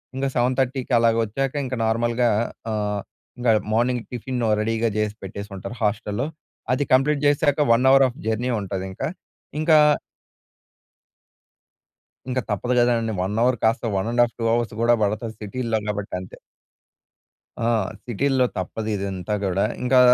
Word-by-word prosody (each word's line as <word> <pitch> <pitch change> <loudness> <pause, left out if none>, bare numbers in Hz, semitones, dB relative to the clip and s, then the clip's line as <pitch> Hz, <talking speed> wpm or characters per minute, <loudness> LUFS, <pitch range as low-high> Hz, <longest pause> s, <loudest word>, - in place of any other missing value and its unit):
ఇంకా 135 +1 0
7:30కి 130 +1 0
అలా 115 0 +4 0.2
వచ్చాక 135 +5 -2
ఇంక 130 0 -3
నార్మల్‌గా 120 +2 +1 0.4
ఆహ్, 105 -1 -1 0.4
ఇంకా 120 -2 +3 0.2
మార్నింగ్ 120 +1 +1
టిఫిన్ 125 0 -3 0.2
రెడీ‌గా 115 +1 0
చేసి 105 -1 -1
పెట్టేసి 100 +2 -7
ఉంటారు 115 +6 -7
హోస్టల్‌లో, 105 +4 -1 0.5
అది 145 - +1
కంప్లీట్ 140 +3 +4
చేసాక 145 0 +2
1 125 +3 +2
అవర్ 135 0 +7
ఆఫ్ 120 - -12
జర్నీ 110 +3 0
ఉంటది 95 -1 -4
ఇంకా. 95 - -3 0.5
ఇంకా 155 0 +5 2.5
ఇంక 130 0 0
తప్పదు 120 +5 -1
కదండీ 115 -2 +2
1 95 +3 -2
అవర్ 125 0 +3
కాస్త 110 +3 +2
one 95 +4 -1
and 120 0 +4
half 120 - -2
two 115 - -1
hours 120 -2 0
కూడా 120 0 +5
పడతది, 110 +2 -2
సిటీ‌‌లో 115 +2 -2
కాబట్టి, 105 -1 -3
అంతే. 90 - -11 1.3
ఆ! - - +2 0.4
సిటీల్లో 130 +3 +2
తప్పదు 110 +4 -3
ఇదంతా 100 0 -3
కూడా. 95 0 +1 0.2
ఇంకా 125 0 +4
115 Hz, 140 wpm, -23 LUFS, 105-125 Hz, 2.5 s, అవర్